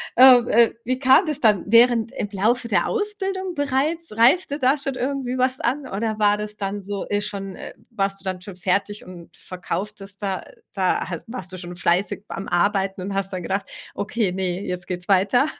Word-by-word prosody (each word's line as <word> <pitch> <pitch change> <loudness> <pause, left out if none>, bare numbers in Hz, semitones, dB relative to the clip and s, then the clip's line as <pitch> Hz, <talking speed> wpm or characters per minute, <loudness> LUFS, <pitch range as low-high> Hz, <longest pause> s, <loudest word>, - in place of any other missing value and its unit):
äh, 255 0 +9 0.3
äh, - - -8
wie 255 +1 -1
kam 265 +7 +5
das 300 -3 -3
dann 210 -5 +3
während 230 +1 +4
im 240 -6 -4
Laufe 230 +5 +1
der - - +1
Ausbildung 390 -4 -2
bereits, 285 +2 +1
reifte 285 +5 +3
da 265 +3 +3
schon 275 -2 -3
irgendwie 260 -1 -2
was 255 +1 +1
an 265 +3 -1
oder 215 +2 -3
war 205 0 +3
das 210 0 -2
dann 200 0 -4
so 200 0 -4
e 205 0 0
schon 195 -2 -5
äh, - - -9 0.2
warst 195 -2 -2
du - - -13
dann 185 -1 -3
schon 185 -1 -9
fertig 200 +3 -1
und 175 -2 -12
verkauftest 195 +2 -6
da 195 -2 -2 0.3
da 185 -4 0
halt 175 - -5
warst 190 -7 -6
du - - -6
schon 175 0 -8
fleißig 185 +4 0
beim 195 - -6
Arbeiten 195 +1 +1
und 195 +2 -4
hast 195 0 -1
dann 180 -2 -4
gedacht: 195 +3 -3 0.2
„Okay, 205 -2 -1
ne, 185 0 -2
jetzt 180 -1 -5
geht's 180 -1 -5
weiter.“ 200 +7 +3
205 Hz, 195 wpm, -22 LUFS, 190-255 Hz, 0.3 s, äh